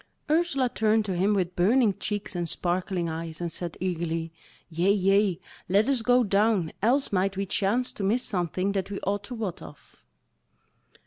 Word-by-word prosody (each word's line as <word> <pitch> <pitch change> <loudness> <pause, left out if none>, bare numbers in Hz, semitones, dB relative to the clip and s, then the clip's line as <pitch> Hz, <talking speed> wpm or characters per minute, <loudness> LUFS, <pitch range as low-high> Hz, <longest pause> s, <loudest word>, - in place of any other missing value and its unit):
Ursula 310 -5 +2
turned 220 -2 +1
to 190 -3 -2
him 195 +4 +2
with 180 -2 -1
burning 215 +4 +3
cheeks 205 -2 -3
and 175 -1 -2
sparkling 180 0 -1
eyes, 160 0 -5
and 170 -1 -3
said 170 0 -4
eagerly: 165 -2 -2 0.4
"Yea, 175 +4 +1
yea, 195 -2 +2 0.3
let 205 +5 +3
us 270 -4 +2
go 245 +2 +4
down, 200 -4 +2
else 260 +7 +2
might 195 0 0
we 195 - -1
chance 210 +6 0
to 200 - -6
miss 230 +6 +1
something 185 0 -1
that 195 -1 -2
we 200 - -4
ought 205 +1 -2
to 245 - -7
wot 210 -7 -4
of." 80 -1 -14
195 Hz, 175 wpm, -26 LUFS, 175-215 Hz, 0.4 s, go